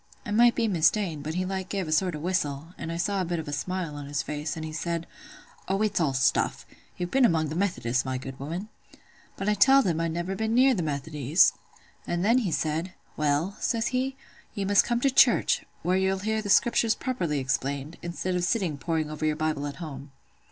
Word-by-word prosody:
I - - -5
might 235 +2 +5
be 230 -1 +1
mista'en—but 165 -4 +1
he 185 +1 0
like 190 0 -4
gave 195 -4 -2
a - - -4
sort 175 +1 +1
of 150 - -6
a - - -9
whistle, 160 -4 -1
and 165 - -6
I 165 - -3
saw 200 +2 0
a - - +1
bit 170 0 -2
of 160 - -5
a 145 - -4
smile 180 +1 -3
on 145 -1 -7
his 145 0 -2
face; 150 +1 -4
and 160 - -4
he 155 - -6
said, 170 +1 -2 0.6
'Oh, 195 +1 0
it's 210 -3 0
all 140 -5 +1
stuff! 135 +1 +1 0.3
You've 175 0 -3
been 270 0 +3
among 160 -8 +3
the 155 - -4
Methodists, 135 -10 0
my 130 -1 -2
good 130 +1 -8
woman.' 170 +9 -5 0.7
But 195 - -3
I 210 - +4
telled 265 +7 +5
him 165 -2 0
I'd 165 -1 -1
never 175 +3 -3
been 220 +2 -1
near 260 +2 +6
the 195 - -1
Methodies. 150 0 +2 0.5
And 175 +2 -1
then 235 +4 +4
he 205 -8 -1
said,—'Well,' 155 +1 -2
says 230 -2 0
he, 260 +1 -1 0.4
'you 200 -2 -2
must 200 0 +4
come 240 0 0
to 275 - +3
church, 265 - +4 0.2
where 180 +1 +2
you'll 190 0 +1
hear 220 0 0
the 205 - -6
Scriptures 230 +1 +4
properly 180 - -2
explained, 135 +3 -2
instead 175 +2 -3
of 180 -1 0
sitting 180 -7 0
poring 160 -1 -1
over 155 - -6
your 155 -1 +2
Bible 155 -2 -1
at 140 - -6
home. 140 -4 -8
170 Hz, 220 wpm, -27 LUFS, 150-200 Hz, 0.7 s, near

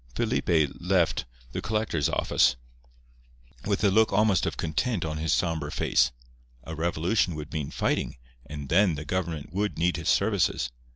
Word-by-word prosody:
Felipe 80 -5 +1
left 90 -6 +1 0.3
the - - -4
collector's 105 -9 0
office - - +2 1.1
with 105 0 0
a 100 - +4
look 110 +3 +4
almost 100 -3 +3
of - - -3
content 85 +4 -1
on 75 -1 -3
his 80 +1 -1
sombre 80 -4 0
face. 65 -3 +2 0.5
A 80 - -7
revolution 85 +3 0
would 75 +1 -7
mean 75 -3 -3
fighting, - - -1 0.3
and 70 -2 -7
then 90 0 +4
the 75 +1 -6
government 85 -2 -3
would 105 +2 -1
need 90 +2 +1
his 85 +1 -2
services. 100 - +1
85 Hz, 155 wpm, -27 LUFS, 75-95 Hz, 1.1 s, a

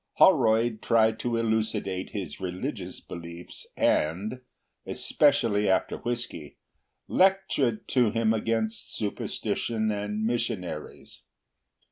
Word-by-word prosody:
Holroyd 110 0 +4
tried 110 -1 +3
to 120 -1 -1
elucidate 110 -4 -1
his 95 -8 -5
religious 90 -1 -4
beliefs, 85 0 -8
and—especially 110 - 0
after 95 - +1
whisky—lectured 120 - -1
to 125 -5 +3
him 110 +1 +2
against 110 0 -1
superstition 110 +1 -1
and 105 +1 -2
missionaries. 110 -9 -3
110 Hz, 80 wpm, -27 LUFS, 100-115 Hz, -, Holroyd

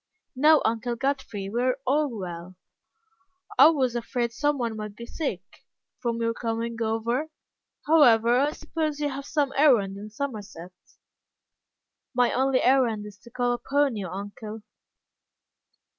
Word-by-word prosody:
"No, 300 +3 +5
Uncle 230 +1 -1
Godfrey, 265 -6 -3
we 230 +5 -2
are 255 0 +1
all 290 +3 +2
well." 180 -5 -7 1.0
"I 275 - +10
was 260 -6 0
afraid 240 0 -2
some 290 +3 0
one 235 -3 -2
might 210 -1 -6
be 235 - -8
sick, 310 +5 -4 0.6
from 235 -1 -2
your 230 0 0
coming 230 0 -3
over. 230 +6 -1 0.6
However, 245 -6 +5
I 285 +2 +2
suppose 310 -1 -3
you 295 -1 0
have 275 0 -6
some 285 -3 0
errand 235 -10 +4
in 210 +1 -8
Somerset." 210 -8 -6 1.4
"My 245 -1 +3
only 260 0 +2
errand 245 -5 +2
is 205 -2 -11
to 235 - -16
call 245 0 0
upon 275 +2 0
you, 200 -3 -4
uncle." 205 +3 -7
240 Hz, 140 wpm, -26 LUFS, 220-275 Hz, 1.4 s, I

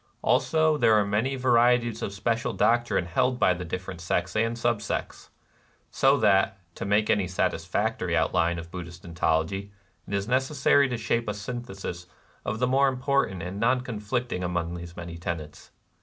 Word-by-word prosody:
Also 155 -1 +3
there 110 -6 +4
are 105 -1 +3
many 110 +7 0
varieties 120 -2 +3
of - - -3
special 115 +3 -1
doctrine 115 -2 +2
held 125 +9 +1
by 95 - +4
the 90 0 -6
different 90 +1 -6
sects 85 0 -1
and 115 +2 +1
sub 115 -2 0
sects, 100 - -4 0.3
— - - -35 0.3
so 135 +1 +4
that, 100 -4 +3 0.2
to - - -6
make 105 +2 +2
any 100 -3 +1
satisfactory 90 - -1
outline 85 +1 +1
of 85 0 -8
Buddhist 85 -1 -8
ontology, 85 +4 -1 0.4
it - - -7
is 100 0 -2
necessary 130 +2 +3
to 125 - -2
shape 115 0 -1
a 105 - -2
synthesis 100 -6 -6 0.4
of 110 - -3
the 125 - +1
more 135 +2 +3
important 130 -8 0
and 90 +3 -5
non 125 +3 +2
conflicting 120 -3 -3
among 85 -1 -2
these 85 0 -8
many 85 -1 -7
tenets. 85 -4 -6
105 Hz, 170 wpm, -26 LUFS, 90-120 Hz, 0.4 s, there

